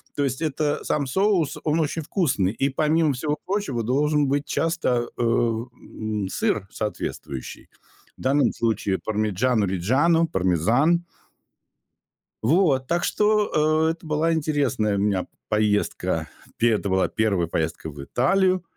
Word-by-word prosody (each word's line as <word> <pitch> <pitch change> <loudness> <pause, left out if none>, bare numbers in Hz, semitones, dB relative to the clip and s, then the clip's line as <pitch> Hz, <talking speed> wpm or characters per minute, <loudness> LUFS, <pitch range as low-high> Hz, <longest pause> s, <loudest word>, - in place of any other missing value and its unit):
То 145 - 0
есть 130 +2 -3
это, 150 -1 -1
сам 145 -2 0
соус 170 -1 +1
он 155 +1 +1
очень 160 +1 -2
вкусный, 145 - 0
и 135 +5 0
помимо 155 +2 +2
всего 150 +4 -2
прочего 185 - -2
должен 145 +4 +1
быть 140 +1 0
часто, 150 -9 0
э, - - -3
э, - - +2
м, 115 -3 -2
сыр 100 0 -1
соответствующий. 85 - -5 0.5
В - - -14
данном 135 0 +2
случае 110 -4 0
"Пармиджано-Риджано"- 110 - +1
пармезан. 115 - +2 1.4
Вот, 135 - +2
так 170 0 0
что, 160 -7 +2
э, - - +3
это 165 0 -9
была 155 +2 +1
интересная 140 -9 0
у - - 0
меня 100 -2 +1
п - - -20 0.2
поездка. 105 -6 0 0.3
Пе 120 0 +3
это 105 -2 -1
была 95 0 +2
1 100 -6 0
поездка 80 0 -3
в 70 -2 -9
Италию. 185 - +2
130 Hz, 140 wpm, -24 LUFS, 105-155 Hz, 1.4 s, э